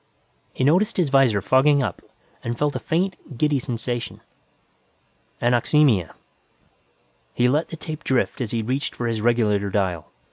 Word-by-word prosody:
He - - -3
noticed 185 - +2
his 175 -6 +2
visor 125 -7 +3
fogging 140 +1 +4
up - - -4 0.4
and 120 0 -3
felt 145 +1 0
a - - -1
faint, 175 -5 -3
giddy 150 +1 +2
sensation. 120 -1 -4 1.2
Anoxemia! 120 - +2 1.2
He 125 - +3
let 150 +6 +1
the 165 - -8
tape 155 0 -7
drift 130 0 0
as 120 - -2
he 115 0 -2
reached 130 +5 -2
for 120 - -4
his 115 -2 -1
regulator 105 -4 +1
dial. 95 -5 -2
125 Hz, 145 wpm, -23 LUFS, 115-150 Hz, 1.2 s, fogging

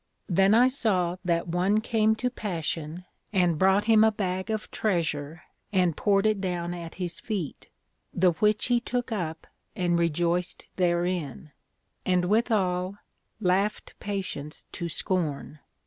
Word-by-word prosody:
Then 195 +2 +4
I 245 +2 +6
saw 190 -9 0
that 170 -2 0
one 180 +5 +2
came 220 -1 +2
to 250 +3 -1
Passion, 170 -5 -4 0.3
and 175 -6 +2
brought 190 +2 +4
him 220 -1 +6
a 220 - +5
bag 190 -2 -3
of 215 -1 -3
treasure, 165 -5 -1 0.3
and 180 -5 +2
poured 200 +2 +2
it 215 -2 +2
down 175 -2 -2
at 170 -2 -7
his 180 -2 -4
feet, 195 - -5 0.4
the 180 0 +3
which 210 +5 +2
he 245 -1 +3
took 245 0 -3
up 165 -6 -3 0.3
and 175 -2 +1
rejoiced 170 +2 0
therein; 175 -5 -1 0.5
and 180 -1 +2
withal, 195 -3 +1 0.4
laughed 200 +1 0
Patience 190 -7 -5
to 170 - -4
scorn. 155 -5 -2
185 Hz, 135 wpm, -27 LUFS, 170-210 Hz, 0.5 s, I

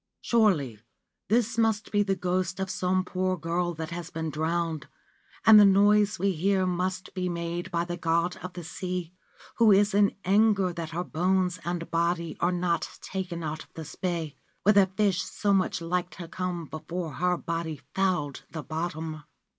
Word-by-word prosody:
Surely 170 - +2 0.5
this 230 +1 +2
must 220 -2 +1
be 205 - +3
the 195 -1 +1
ghost 185 +1 -1
of 190 -1 -2
some 185 0 0
poor 185 0 -1
girl 170 +1 -1
that 160 +1 -5
has 170 0 -5
been 160 -2 -4
drowned, 160 0 -1 0.6
and 220 -1 +10
the - - +9
noise 205 +2 +4
we 195 +2 +1
hear 190 +2 +1
must 185 +1 -2
be 180 -1 -2
made 170 0 -3
by 170 -1 -1
the 175 0 -4
God 170 +1 +1
of 180 0 -8
the 175 - -7
Sea, 180 0 -4 0.4
who 230 -2 +6
is 205 +1 +4
in 200 0 +3
anger 200 -1 +3
that 165 -2 -5
her 170 +2 -3
bones 180 +1 0
and 175 -1 -4
body 170 0 0
are 175 - +2
not 175 -2 -1
taken 185 -3 -4
out 155 0 -4
of - - -27
this 160 -1 -7
bay, 170 -5 -3 0.3
where 210 - +6
the 200 -2 +6
fish 195 -1 +1
so 205 -1 -1
much 185 -2 +1
liked 175 +1 -2
to 175 -3 -8
come 175 -1 -3
before 160 +1 -5
her 180 +1 +1
body 165 -3 -4
fouled 180 -8 0
the 160 -2 -6
bottom.' 160 -1 -4
180 Hz, 180 wpm, -27 LUFS, 165-190 Hz, 0.6 s, and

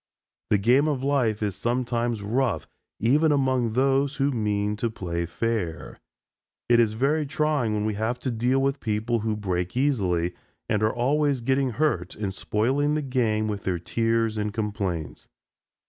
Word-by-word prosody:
The 105 - +4
game 125 +9 +3
of 140 -4 -1
life 125 -7 +1
is 100 -3 -1
sometimes 120 -2 -1
rough, 120 +2 0 0.3
even 150 +7 +3
among 130 -5 +1
those 135 +3 +2
who 140 +1 +1
mean 105 -3 0
to 115 +2 -1
play 85 -5 -3
fair. 105 -4 -3 0.7
It 120 0 +5
is 110 -2 +3
very 140 +7 +1
trying 145 -7 0
when 105 0 -1
we 110 - 0
have 110 +4 -1
to 130 - -1
deal 120 +3 +1
with 135 +1 0
people 110 +1 -1
who 110 0 -1
break 90 -1 -2
easily, 95 -11 +1 0.3
and 105 - 0
are 110 0 +3
always 140 +3 +1
getting 130 +1 +1
hurt 110 - 0
and 100 -2 -3
spoiling 135 +10 0
the 155 - -1
game 115 -5 0
with 105 -2 -3
their 90 -2 0
tears 115 +4 0
and 105 0 -1
complaints. 100 -7 -4
115 Hz, 160 wpm, -25 LUFS, 105-135 Hz, 0.7 s, It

